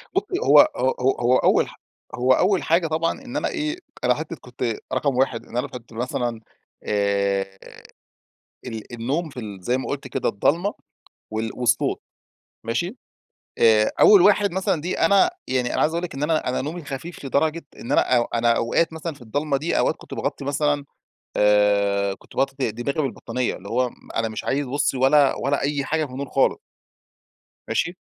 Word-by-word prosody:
بصي 385 -1 0
هو - - +7 0.2
هو 130 - +2
هو 130 +1 +1
هو 125 +1 +4
أول - - +3
حا - - -13 0.4
هو 125 +1 +3
أول 190 +7 +2
حاجة 165 +1 +2
طبعًا 160 +1 0
إن 265 +1 -6
أنا - - 0
إيه، 310 0 -2 0.3
أنا - - +4
حتى - - -5
كنت - - -4 0.2
رقم 140 -3 +1
1 130 -3 0
إن 120 - -7
أنا 125 +3 0
كنت 125 -4 -11
مثلًا 120 0 -2 0.4
آآ 100 -1 0 1.1
ال 115 -1 -7
النوم 135 +8 -2
في 130 - -8
ال 105 -4 -7
زي 120 +7 0
ما 130 - -5
قُلت 140 -2 -4
كده - - -1
الضلّمة 170 - +1 0.6
وال 110 0 -2
والصوت 120 -1 +1 0.6
ماشي؟ 175 - -2 0.6
آآ، 110 -1 +5
أول 205 -3 +8
واحد 205 +1 +4
مثلًا 185 -3 0
دي 175 +4 -3
أنا 200 - +5 0.2
يعني 125 -2 0
أنا - - 0
عايز 155 - +2
أقول 170 +1 -2
لِك 175 - -5
إن 135 - -3
أنا، 155 -3 +1
أنا 125 - -1
نومي 160 +5 -5
خفيف 145 +3 -7
لدرجة 155 +4 0
إن - - -6
أنا 120 -2 +3
أنا 120 0 +3
أوقات 160 +8 +1
مثلًا 160 +1 -5
في 140 - -18
الضلمة 140 +5 -1
دي 155 +5 -1
أوقات - - +2
كنت - - -11
باغطي 140 0 -3
مثلًا 145 0 0 0.5
آآ 100 -1 +3
كنت - - -19
باغطي 135 0 0
د - - -11
دماغى 140 +6 -2
بالبطانية 125 -2 -2
اللي 100 - -11
هو 125 +2 +1 0.3
أنا 115 0 +1
مش 110 - -6
عايز 140 +1 0
بصي 135 +1 0
ولا 135 +2 +4
ولا 140 +1 +1
أي 140 0 0
حاجة 155 +3 0
في 135 - -9
النور 135 +1 -5
خالص. 135 - +2 1.1
ماشي؟ 175 +2 -1
135 Hz, 180 wpm, -23 LUFS, 115-160 Hz, 1.1 s, أول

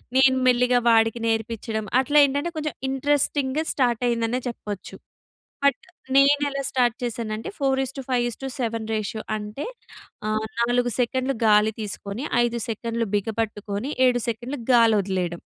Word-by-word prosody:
నేను 265 0 +5
మెల్లిగా 250 0 +4
వాడికి 225 0 +4
నేర్పించడం 225 -1 -2
అట్లా 290 +3 +2
ఏంటంటే 285 +4 -1
కొంచెం 305 -1 -2 0.2
ఇంట్రెస్టింగ్‌గా 285 +1 +1
స్టార్ట్ 245 -4 +1
అయిందనే 235 +1 0
చెప్పొచ్చు. 210 -5 -6 0.7
బట్ 280 -3 +3 0.4
నేను 280 +1 +5
ఎలా 275 0 -3
స్టార్ట్ 245 -3 +2
చేసానంటే 225 -2 -3
4:5:7 260 -3 -2
రేషియో 215 0 -3
అంటే 210 +6 -6 0.6
ఆ! - - 0 0.3
నాలుగు 245 +1 +1
సెకండ్లు 260 +2 0
గాలి 210 0 +5
తీసుకొని 205 +3 -5 0.2
ఐదు 235 0 -1
సెకండ్లు 230 +1 -2
బిగపట్టుకొని 215 +2 -3 0.2
ఏడు 245 -1 +3
సెకండ్లు 240 +4 -4
గాలి 230 -2 +6
వదిలేయడం. 180 -3 -2
240 Hz, 120 wpm, -24 LUFS, 220-265 Hz, 0.7 s, గాలి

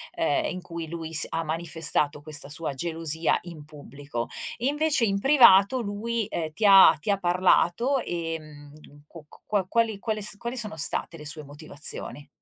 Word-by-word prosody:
ehm, 330 -1 0
in 185 - -6
cui 170 -2 -7
lui 165 -1 -7
s 160 - +4
ha 165 0 -2
manifestato 155 -2 -1
questa 145 -2 -5
sua 150 0 -4
gelosia 160 +2 -1
in 170 -4 -10
pubblico. 145 -4 -7 0.3
Invece 290 0 +1
in 200 -2 0
privato 255 -3 +6
lui 225 +1 -3
ehm, 160 -4 -4
ti 200 +7 -2
ha 195 -1 +8
ti 210 - -2
ha 200 - +1
parlato 185 +7 +2
ehm, 155 -5 -6 0.4
qu 165 -1 -13
q - - -17
qua 205 -3 0
quali 225 -2 0
quali 215 -1 -3
s 210 +1 0
quali 235 +4 -5
sono 215 -7 -3
state 160 +2 -1
le 150 - -11
sue 155 +1 -6
motivazioni? 145 0 -4
170 Hz, 170 wpm, -25 LUFS, 155-215 Hz, 0.4 s, ha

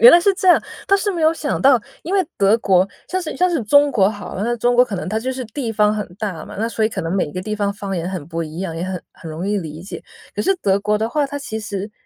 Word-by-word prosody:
原 235 +2 +11
来 345 - +8
是 395 +3 +4
这 380 -1 -3
样。 355 - +7 0.3
但 395 - +5
是 410 +1 0
没 345 - -3
有 315 - +5
想 305 -2 -2
到， 265 -3 +6 0.2
因 360 - -5
为 380 -2 +3
德 200 +2 +4
国， 190 -3 +3 0.2
像 370 - -1
是 330 -4 -5
像 365 0 +3
是 320 -8 0
中 285 +6 +5
国 200 -7 +4
好 205 -1 -8
了， 190 - -3
那 240 +1 0
中 245 +1 +2
国 250 +1 +6
可 225 - -6
能 175 - -4
它 215 +3 0
就 255 +4 -2
是 255 -1 -5
地 230 0 -4
方 210 0 +3
很 210 -1 -3
大 190 -8 -4
嘛， - - -10
那 225 +2 0
所 220 -1 0
以 - - +3
可 215 - -4
能 165 +2 -2
每 185 -6 0
个 185 - -3
地 210 +3 -3
方 205 -1 0
方 200 -2 -4
言 170 +1 -2
很 185 -6 -4
不 165 +1 -3
一 160 0 -7
样， 180 -3 -3
也 170 - -2
很 185 -2 -4
很 165 - -10
容 165 +5 -4
易 205 0 +1
理 160 -2 -7
解。 190 - -8 0.3
可 - - -1
是 390 - +3
德 200 - +2
国 210 +1 +1
的 220 - 0
话， 290 +3 +1
它 285 +1 -5
其 250 -6 -5
实 205 -1 -5
215 Hz, 335 characters per minute, -20 LUFS, 190-275 Hz, 0.3 s, 原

